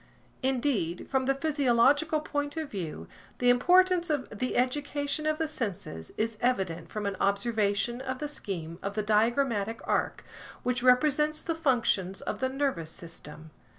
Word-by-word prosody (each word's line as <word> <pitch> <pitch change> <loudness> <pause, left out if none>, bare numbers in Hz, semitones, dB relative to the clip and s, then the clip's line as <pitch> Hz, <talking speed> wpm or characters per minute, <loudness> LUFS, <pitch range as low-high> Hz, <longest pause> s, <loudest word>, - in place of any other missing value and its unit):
Indeed 245 - 0
from 265 -1 +1
the 275 - +3
physiological 290 +1 +3
point 290 0 -3
of 315 -3 -3
view, 160 - -5 0.3
the 245 0 +5
importance 360 +6 +4
of 295 -4 0
the 250 +5 -2
education 285 +3 0
of 310 0 +1
the 320 0 0
senses 195 - -5
is 220 0 -1
evident 190 -9 0
from 210 -1 -4
an 200 -1 -1
observation 205 +3 +1
of 260 -1 -3
the 295 - -3
scheme 175 - -5
of 200 +1 -4
the 215 - 0
diagrammatic 225 0 +1
arc - - -1 0.4
which 250 0 0
represents 300 +4 +4
the 330 - -2
functions 235 - +1
of - - -4
the 260 - 0
nervous 265 - -1
system. 160 -2 -9
250 Hz, 150 wpm, -29 LUFS, 200-290 Hz, 0.4 s, the